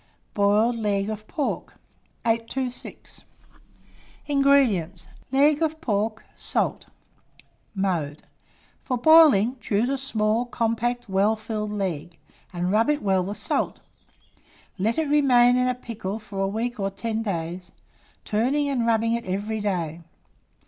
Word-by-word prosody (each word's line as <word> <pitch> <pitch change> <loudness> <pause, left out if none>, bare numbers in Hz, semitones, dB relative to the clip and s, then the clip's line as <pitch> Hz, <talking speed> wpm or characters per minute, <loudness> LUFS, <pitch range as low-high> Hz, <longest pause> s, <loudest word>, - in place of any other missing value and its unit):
BOILED 210 +4 +3
LEG 205 -1 -1
OF 215 0 -7
PORK. 295 - -3 0.5
826. 235 +3 -3 1.0
INGREDIENTS. 265 - +2 0.2
Leg 290 +3 +4
of 315 -1 0
pork; 220 -5 -1
salt. - - -1 0.9
Mode. 170 -7 -2 0.6
For 255 - -2
boiling, 270 -5 +6
choose 225 +2 0
a 275 0 -1
small, 225 -3 0
compact, 240 +1 -1
well 200 +3 +2
filled 215 -1 -4
leg, 175 -5 -4 0.3
and 180 0 -2
rub 220 +6 +3
it 295 -4 0
well 190 -2 +2
with 200 +3 -5
salt; - - -1 1.0
let 220 +7 0
it 320 -2 0
remain 250 -4 +5
in 250 0 +2
pickle 220 -5 -5
for 205 -3 -8
a 195 - +1
week 225 +4 -3
or 195 0 0
ten 220 +3 -3
days, 180 -3 -4 0.5
turning 260 +7 +1
and 245 -4 0
rubbing 230 0 +2
it 235 0 -2
every 205 +4 -2
day. 175 -6 -2
220 Hz, 125 wpm, -24 LUFS, 195-245 Hz, 1.0 s, boiling